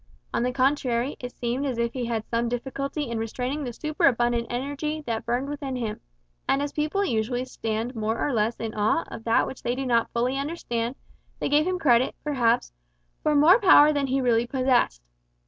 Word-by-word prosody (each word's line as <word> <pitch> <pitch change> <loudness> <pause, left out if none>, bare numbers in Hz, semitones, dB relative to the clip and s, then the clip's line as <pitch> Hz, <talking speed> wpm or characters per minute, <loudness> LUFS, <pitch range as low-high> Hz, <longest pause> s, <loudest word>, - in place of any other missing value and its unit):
On - - +1
the 250 +1 +1
contrary, 255 -1 +1
it 245 0 -6
seemed 245 +3 -2
as 260 -4 -2
if 235 0 -1
he 250 -2 -3
had 225 -2 -2
some 235 0 0
difficulty 275 +4 -3
in 235 -1 -3
restraining 250 +6 -3
the 250 - -4
superabundant 240 -4 +1
energy 285 +5 -3
that 230 -1 -3
burned 245 +3 0
within 280 -2 -4
him; 230 -4 -3 0.5
and 275 - +3
as 285 0 -3
people 310 +7 0
usually 245 - -1
stand 225 -1 -3
more 220 +1 -1
or 285 - -1
less 225 +1 +1
in 225 -1 -4
awe 215 +10 +1
of 225 - -8
that 230 0 +3
which 265 - -8
they 240 - -1
do 270 +1 -3
not 235 -2 +2
fully 250 +3 0
understand, 255 -5 -3 0.4
they - - -1
gave 300 +3 +3
him 370 0 0
credit, 255 -7 +3
perhaps, 240 - +1 0.5
for 300 - +1
more 320 +9 +7
power 305 -7 +7
than 285 -2 0
he 265 +1 +1
really 240 -1 +2
possessed. 255 - +1
250 Hz, 195 wpm, -25 LUFS, 235-285 Hz, 0.5 s, more